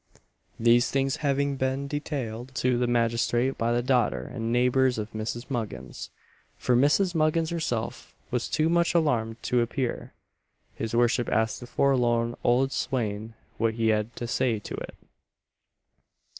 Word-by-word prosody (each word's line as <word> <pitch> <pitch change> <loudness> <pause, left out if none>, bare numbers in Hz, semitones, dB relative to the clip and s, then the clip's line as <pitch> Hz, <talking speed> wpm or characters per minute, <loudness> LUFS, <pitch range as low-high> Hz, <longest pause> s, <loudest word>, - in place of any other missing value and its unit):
These 120 +1 +4
things 135 0 0
having 140 -1 0
been 130 +1 -1
detailed 130 -4 -4
to 125 -1 +2
the 125 - +1
magistrate 120 +2 +1
by 115 +1 0
the 120 0 +1
daughter 120 - +1
and 115 -2 -3
neighbours 125 +1 +3
of 110 +1 -4
Mrs. 110 +3 -4
Muggins 110 - -5 0.5
for 125 - +1
Mrs. 150 +9 +3
Muggins 160 0 +1
herself 140 -10 -3 0.2
was 120 -1 -1
too 155 +1 +2
much 170 +1 +2
alarmed 115 -9 +1
to 125 -1 +2
appear 120 +1 -3 0.6
his 115 +1 -4
worship 120 0 +2
asked 110 +1 +1
the 125 - -9
forlorn 120 -3 +2
old 130 +3 +3
swain 110 -4 -2 0.2
what 115 -1 +1
he 115 -1 +1
had 110 +1 0
to 120 - -4
say 120 -1 +1
to 105 - -8
it. - - -6
120 Hz, 145 wpm, -27 LUFS, 115-135 Hz, 0.6 s, These